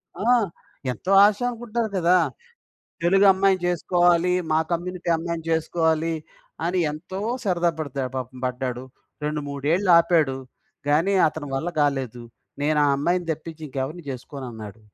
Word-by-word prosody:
ఆ! - - -5 0.7
ఎంతో 155 - -4
ఆశానుకుంటారు 235 +1 -1
కదా! 180 +1 +4 0.9
తెలుగమ్మాయిని 195 +1 +4
చేసుకోవాలి, 175 0 +2 0.2
మా 155 - +4
కమ్యూనిటీ 175 +1 -3
అమ్మాయిని 165 0 -4
చేసుకోవాలి 160 0 +1 0.5
అని 180 +2 0
ఎంతో 175 +5 -7 0.2
సరదా 175 -4 +2
పడతాడు 135 -4 -3
పాపం 130 0 -5
పడ్డాడు. 125 0 -3 0.4
రెండు 150 0 -1
మూడేళ్ళాపాడు, 165 0 +3 0.5
గాని 160 +7 +3
అతని 155 -1 -6
వల్ల 135 +6 -1
కాలేదు. 135 -5 -1 0.4
"నేను 150 +1 +2
ఆ - - +3
అమ్మాయిని 175 +5 0
తెప్పించి 160 +1 -7
ఇంకెవరిని 140 +5 -4
చేసుకోనన్నాడు". 120 -5 -8
165 Hz, 110 wpm, -24 LUFS, 140-180 Hz, 0.9 s, కదా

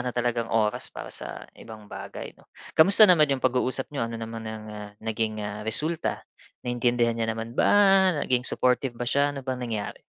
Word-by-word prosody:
na 125 - -3
talagang 120 -1 0
oras 110 -1 0
para - - -9
sa - - -7
ibang 110 -2 -12
bagay 100 -1 -8
'no? - - -25 0.2
Kumusta 200 +7 +7
naman 165 -6 +5
'yong 135 -2 -1
pag-uusap 130 +2 0
niyo? 115 -5 -2
Ano 115 - -5
naman 115 0 -6
ang, 110 0 -7
ah, 105 -1 -8
naging, 110 -1 -1
ah, 105 0 -5
resulta? 155 +8 -1 0.4
Naintindihan 120 -1 +1
niya 115 -1 -2
naman 115 +1 -4
ba? - - +2 0.6
Naging 125 0 0
supportive 125 -1 0
ba 120 - -3
siya? 140 +3 +1
Ano 135 - -7
bang 130 -1 -3
nangyari? 110 -4 -4
120 Hz, 185 wpm, -26 LUFS, 110-130 Hz, 0.6 s, Kumusta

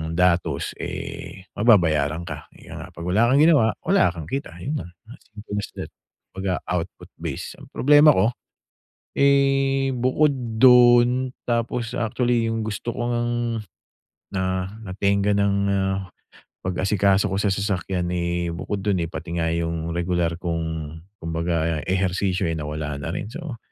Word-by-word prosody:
datos, 85 -4 +1
eh, 95 - -6
mababayaran 85 -8 +3
ka. - - -7
Kaya - - -11
nga - - -8
'pag 85 - -10
wala 105 +6 +3
kang 140 +2 +5
ginawa, 145 -9 +5
wala 190 - +4
kang 80 -3 -8
kita 135 -11 -4
yun 150 +3 -2
lang. 90 - -12 0.2
As 125 - -11 0.2
simple 105 -1 -6
as 100 - -5
that. - - -5 0.4
'Baga 95 -1 -2
output 90 -2 -4
base. - - -6
Ang - - -13
problema 145 +2 +6
ko, 110 +4 +2 0.9
eh, 135 -1 +3
bukod 130 +4 +2 0.3
dun, 125 0 +6 0.2
tapos 115 0 -1
actually, 115 0 0
yung 115 -1 -2
gusto 110 +3 -3
ko 120 -1 -2
ngang 120 -1 -1 0.7
na 95 +1 -2
natengga 100 +1 +1
nang, 100 0 +2
ah, 95 0 0 0.6
pag-asikaso 95 +2 +2
ko - - -2
sa 105 - +1
sasakyan, 95 -2 -1
eh, 85 0 -1
bukod 100 +4 -4
dun, 100 -3 +1
eh, 85 - -2
pati 85 +2 -6
nga 80 - +1
yung 85 0 -2
regular 85 -1 0
kong 80 -2 -3 0.3
kumbaga, 80 -1 -1
ehersisyo 95 0 0
ay - - -1
nawala 75 0 -4
na 80 - -4
rin. 100 - -4
So, 155 -6 -7
100 Hz, 145 wpm, -23 LUFS, 85-120 Hz, 0.9 s, problema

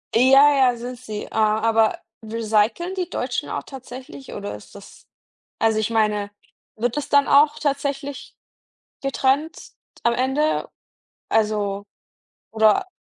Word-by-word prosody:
Ja, 270 +4 +6 0.2
ja, - - -6
sind 245 +1 -7
sie. 215 -4 -6
Äh, - - -9
aber 220 +1 +2 0.3
recyceln 225 - 0
die 365 -3 -3
Deutschen - - -3
auch - - -4
tatsächlich 265 +1 -10
oder 200 - -5
ist 105 - -14
das 200 - -14 0.5
also 220 -1 +2
ich 215 +1 -1
meine, 210 -2 +1 0.5
wird 240 +4 -2
das 295 - -3
dann 285 -1 +4
auch 295 +2 +5
tatsächlich 280 -1 -3 0.7
getrennt 275 +3 -1 0.3
am 235 - +4
Ende? 265 +5 0 0.6
Also, 205 -2 0 0.7
oder 220 - +3
240 Hz, 125 wpm, -22 LUFS, 215-280 Hz, 0.7 s, Ja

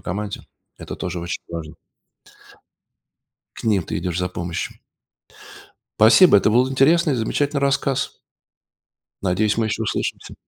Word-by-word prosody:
команде 100 +3 -5 0.3
это - - -7
тоже 90 -1 -4
очень 85 +1 -5
важно. 85 -1 -7 1.8
К - - -10
ним 105 -6 +2
ты 80 - -4
идешь 90 0 -3
за 90 - -1
помощью. 85 -1 -5 1.2
Спасибо 110 - +7
это 100 - +3
был 125 +4 +3
интересный 150 +4 +3
и - - 0
замечательный 140 +5 -1
рассказ. 140 -1 0 1.1
Надеюсь 105 +4 +1
мы 115 - +1
еще 110 +1 -2
услышимся. - - -3
105 Hz, 125 wpm, -21 LUFS, 90-135 Hz, 1.8 s, Спасибо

